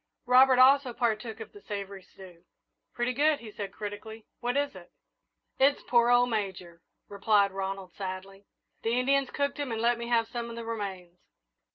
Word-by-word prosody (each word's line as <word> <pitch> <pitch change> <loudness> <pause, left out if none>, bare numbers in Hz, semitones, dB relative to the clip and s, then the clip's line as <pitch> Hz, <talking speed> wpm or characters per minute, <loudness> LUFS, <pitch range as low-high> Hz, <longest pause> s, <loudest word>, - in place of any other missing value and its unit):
Robert 255 +1 +6
also 260 0 +5
partook 225 -1 -2
of 220 - -9
the 410 - -13
savoury 200 - -6
stew. 185 -2 -15 0.5
"Pretty 240 +1 -1
good," 295 +3 +2
he 225 -2 -10
said 200 -2 -6
critically; 215 +1 -8
"what 245 +3 -1
is 285 0 0
it?" 180 -1 -13 0.7
"It's 275 +2 +3
poor 240 -1 +3
old 245 0 +4
Major," 185 -5 -4 0.3
replied 200 0 +2
Ronald, 195 -1 -5
sadly; 195 +1 -7 0.3
"the 230 +2 0
Indians 275 +1 +2
cooked 280 +1 -2
him 285 -4 -3
and 225 - -2
let 235 +1 +2
me 235 - -5
have 230 -1 +2
some 235 0 -5
of 230 - -7
the 230 0 -7
remains." 190 -6 -6
225 Hz, 175 wpm, -28 LUFS, 195-245 Hz, 0.7 s, Robert